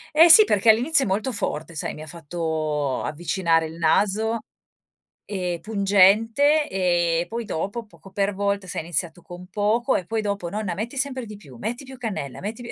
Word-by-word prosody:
Eh 330 Hz, +2 st, +7 dB
sì 430 Hz, +6 st, +10 dB
perché 220 Hz, -, +3 dB
all'inizio 265 Hz, +6 st, +4 dB
è -, -, -4 dB
molto 215 Hz, +7 st, -1 dB
forte 165 Hz, -5 st, -4 dB
sai, 155 Hz, -, -3 dB
mi -, -, -11 dB
ha 155 Hz, -, -9 dB
fatto 155 Hz, -4 st, -3 dB
avvicinare 165 Hz, +1 st, 0 dB
il 160 Hz, +1 st, -9 dB
naso, 210 Hz, +6 st, +1 dB, 0.9 s
ehm, 180 Hz, -4 st, -4 dB
pungente 220 Hz, +8 st, +3 dB
e 175 Hz, -3 st, +1 dB
poi 230 Hz, 0 st, -4 dB
dopo, 205 Hz, +5 st, -4 dB
poco 190 Hz, 0 st, -17 dB
per 200 Hz, +1 st, -1 dB
volta, 200 Hz, -1 st, -2 dB
se -, -, -5 dB
hai -, -, -5 dB
iniziato 170 Hz, +1 st, -3 dB
con 175 Hz, +2 st, -11 dB
poco 215 Hz, +5 st, 0 dB
e 180 Hz, -, -2 dB
poi 225 Hz, +5 st, -2 dB
dopo: 200 Hz, -4 st, -3 dB
"Nonna 205 Hz, -1 st, -3 dB
metti 230 Hz, +9 st, -5 dB
sempre 260 Hz, -2 st, -2 dB
di 210 Hz, -1 st, -10 dB
più, 140 Hz, -11 st, -15 dB
metti 240 Hz, -, -5 dB
più 265 Hz, 0 st, -11 dB
cannella, 195 Hz, -, -5 dB
metti 220 Hz, +4 st, -6 dB
più" 235 Hz, -, -7 dB
200 Hz, 190 wpm, -23 LUFS, 170-225 Hz, 0.9 s, sì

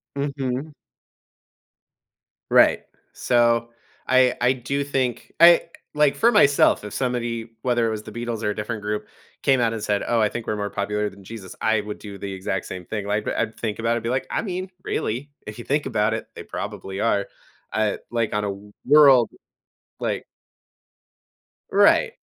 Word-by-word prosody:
Mhm. 140 Hz, 0 st, -3 dB, 1.8 s
Right. -, -, +5 dB, 0.3 s
So, 120 Hz, -1 st, +2 dB, 0.4 s
I 130 Hz, -1 st, +4 dB
I 125 Hz, +1 st, +4 dB
do 135 Hz, +3 st, -2 dB
think 130 Hz, -4 st, -2 dB
I 170 Hz, +1 st, +8 dB, 0.3 s
like, 150 Hz, -2 st, +3 dB
for 230 Hz, -, +5 dB
myself, 145 Hz, -, +4 dB
if 105 Hz, -, -7 dB
somebody, 120 Hz, -3 st, -2 dB
whether 120 Hz, -2 st, +1 dB
it -, -, 0 dB
was 110 Hz, -1 st, -4 dB
the -, -, -10 dB
Beatles 120 Hz, -1 st, -4 dB
or 105 Hz, -, +1 dB
a -, -, -2 dB
different 105 Hz, +1 st, -4 dB
group 105 Hz, 0 st, -3 dB, 0.3 s
came 135 Hz, -2 st, +3 dB
out 115 Hz, -, +2 dB
and 110 Hz, -, -4 dB
said, 100 Hz, -1 st, 0 dB
"Oh, 120 Hz, -, +2 dB
I 105 Hz, -, +4 dB
think 115 Hz, +1 st, -6 dB
we're 110 Hz, -, -1 dB
more 100 Hz, 0 st, -2 dB
popular 105 Hz, +1 st, -2 dB
than 100 Hz, 0 st, -16 dB
Jesus," 100 Hz, -2 st, -9 dB
I 110 Hz, -1 st, +2 dB
would 105 Hz, 0 st, -7 dB
do 100 Hz, -2 st, -9 dB
the 100 Hz, 0 st, -6 dB
exact 95 Hz, 0 st, -3 dB
same 90 Hz, -1 st, -7 dB
thing. 105 Hz, 0 st, -4 dB
Like, 105 Hz, +1 st, -1 dB
I'd 110 Hz, -, -2 dB
think 110 Hz, -2 st, -3 dB
about 115 Hz, +1 st, +1 dB
it -, -, +1 dB
and 115 Hz, -, -6 dB
be 115 Hz, -, -2 dB
like, 130 Hz, +2 st, -1 dB
"I -, -, -1 dB
mean, 185 Hz, -1 st, -4 dB
really, 130 Hz, +7 st, -3 dB, 0.2 s
if 105 Hz, -, -7 dB
you 120 Hz, -, -8 dB
think 145 Hz, +2 st, 0 dB
about 105 Hz, +1 st, +1 dB
it, 110 Hz, -, -4 dB
they -, -, -8 dB
probably 95 Hz, +1 st, -6 dB
are." 100 Hz, -3 st, +1 dB, 0.5 s
Uh, 110 Hz, -2 st, +1 dB
like, 115 Hz, -2 st, -1 dB
on 105 Hz, 0 st, 0 dB
a -, -, -1 dB
w 100 Hz, +1 st, -9 dB
world 140 Hz, -4 st, +7 dB, 0.7 s
like -, -, -2 dB, 1.5 s
Right. 205 Hz, -, +4 dB
115 Hz, 185 wpm, -23 LUFS, 105-130 Hz, 1.8 s, I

